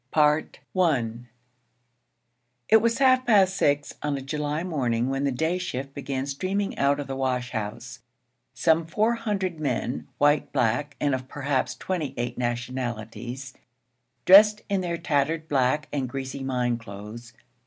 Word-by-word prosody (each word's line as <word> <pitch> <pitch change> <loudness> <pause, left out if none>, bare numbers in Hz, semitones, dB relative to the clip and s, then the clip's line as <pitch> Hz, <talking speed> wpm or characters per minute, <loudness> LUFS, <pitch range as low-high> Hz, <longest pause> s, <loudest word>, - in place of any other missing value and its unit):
I 150 0 +4 2.2
It 220 - +8
was 230 +1 +1
half 255 -1 +4
past 195 -6 +4
six 145 -4 +1
on 145 -1 -1
a - - -5
July 150 +2 -2
morning 125 -8 0
when 135 +1 -1
the 140 - +1
day 160 +8 0
shift 135 -6 -4
began 135 -1 -3
streaming 185 +8 -2
out 140 +1 +3
of 145 - -3
the 135 0 -5
wash 125 -2 -1
house: 110 +1 -5 0.6
some 160 +5 +2
four 215 +7 +2
hundred 195 -7 -2
men, 125 -4 -2
white, 145 0 +3
black, 135 +3 0
and 145 -2 +1
of 130 0 -3
perhaps 140 -1 -1
twenty 175 -7 -3
eight 120 0 -2
nationalities, 120 +1 -4 0.7
dressed 210 +3 +7
in 200 -1 +1
their 170 -2 -2
tattered, 155 +1 0
black, 140 +1 +1
and 135 -3 -1
greasy 135 +1 -5
mine 125 -2 0
clothes. 110 +2 -10
140 Hz, 145 wpm, -26 LUFS, 125-165 Hz, 2.2 s, It